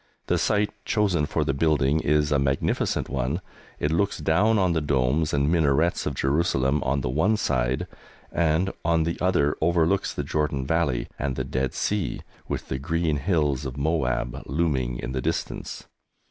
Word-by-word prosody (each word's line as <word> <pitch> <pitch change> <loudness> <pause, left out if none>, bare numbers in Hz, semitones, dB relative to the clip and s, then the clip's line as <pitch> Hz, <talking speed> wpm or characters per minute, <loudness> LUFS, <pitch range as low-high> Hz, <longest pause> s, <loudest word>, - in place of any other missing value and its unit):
The - - +1
site 105 0 +1
chosen 95 -9 +1
for - - 0
the 70 - 0
building 75 0 +2
is 75 0 +1
a 70 - +3
magnificent 70 0 0
one. 70 +4 -1 0.4
It 75 - 0
looks 100 +5 +1
down 95 +8 +2
on 95 -3 +2
the 80 - 0
domes 70 +2 +1
and 70 0 +1
minarets 80 0 +2
of - - -2
Jerusalem 70 -1 +1
on 70 +1 0
the 60 - -2
one 95 - +2
side, 65 -7 0 0.5
and, 85 +3 +1
on 80 -1 +2
the 85 +1 -2
other, 90 -6 +2
overlooks 85 +3 +2
the - - -3
Jordan 75 -3 -1
Valley 70 -5 0
and 70 -2 -1
the - - -2
Dead 65 0 -2
Sea, 105 -5 -1 0.3
with - - -4
the 65 - -3
green 80 +1 0
hills 75 -4 0
of 65 -1 -5
Moab 65 -4 -1
looming 70 -6 0
in - - -5
the 65 0 -2
distance. - - -3
75 Hz, 170 wpm, -25 LUFS, 65-85 Hz, 0.5 s, a